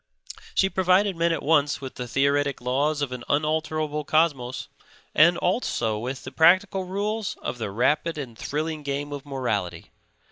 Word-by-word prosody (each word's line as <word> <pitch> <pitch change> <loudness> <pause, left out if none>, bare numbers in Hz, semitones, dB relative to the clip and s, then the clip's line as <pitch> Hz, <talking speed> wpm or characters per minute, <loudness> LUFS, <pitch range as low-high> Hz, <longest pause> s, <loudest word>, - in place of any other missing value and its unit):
She 195 - +4
provided 190 +1 +2
men 170 0 +1
at 165 - -2
once 145 -1 +2
with 130 -1 -7
the 125 - -6
theoretic 140 +2 +1
laws 140 +5 0
of 135 - -3
an 125 -1 -6
unalterable 155 0 0
cosmos 145 -5 0 0.5
and 170 +3 +6
also 120 - 0
with 130 +4 -5
the 130 - -7
practical 185 +4 +4
rules 205 +3 -2
of 120 - -4
the 110 - -3
rapid 150 +10 +1
and 130 -6 -6
thrilling 155 +6 -3
game 145 0 -3
of 145 0 -7
morality. 105 -11 -3
145 Hz, 155 wpm, -25 LUFS, 130-165 Hz, 0.5 s, and